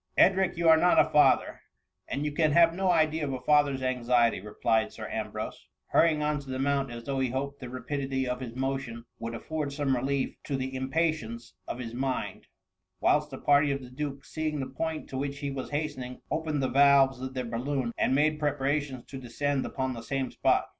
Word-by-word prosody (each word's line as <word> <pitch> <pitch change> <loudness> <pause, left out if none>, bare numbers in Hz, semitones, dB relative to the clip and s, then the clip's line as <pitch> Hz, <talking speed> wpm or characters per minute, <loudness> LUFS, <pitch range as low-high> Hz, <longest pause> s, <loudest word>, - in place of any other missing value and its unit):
^ - - -58
"Edric, 190 -2 +4
you 170 0 +1
are 160 0 +8
not 175 +2 +4
a - - +3
father, 150 - +4 0.5
and 140 +3 -2
you 150 - -1
can 155 0 +2
have 170 0 +6
no 190 +1 0
idea 160 -2 +2
of 140 -2 -2
a 130 - -3
father's 140 0 +2
anxiety,^' 120 -5 +2
replied 110 +1 0
Sir - - -7
Ambrose, - - -5 0.2
hurrying 155 -2 +3
on 150 0 0
to 140 -1 -11
the 130 - -3
mount, 140 0 0
as 120 0 -7
though 135 +2 -2
he 130 -1 +1
hoped 140 +3 -3
the 125 - -7
rapidity 135 +1 -3
of 125 0 -2
his 120 -3 -7
motion 130 -3 -3
would 115 0 -4
af - - -8
ford 155 -3 -2
some 140 -2 0
relief 135 +2 -1
to 140 - -2
the 130 0 -3
impatience 130 -4 -2
of - - -4
his 115 -2 -6
mind; 130 +1 -3 0.5
whilst 150 0 +2
the 135 - -7
party 145 +1 +4
of 140 - -1
the 125 -1 -11
duke, 140 +1 -5
seeing 155 -1 -3
the 135 - -2
point 160 +3 -4
to 130 - -5
which 140 0 -3
he 140 -1 -3
was 135 -1 -5
hastening, 145 -4 -4
opened 155 -3 -1
the - - +2
valves 135 -1 +5
of 130 0 -5
their 130 -1 -2
balloon, 120 +2 -2
and 130 - +1
made 150 +2 +2
preparations 145 -2 -1
to 135 - -8
de 125 - -10
scend 140 +3 0
upon 130 -1 -2
the 115 - -7
same 135 +1 -2
spot. - - +2
135 Hz, 215 wpm, -28 LUFS, 130-150 Hz, 0.5 s, are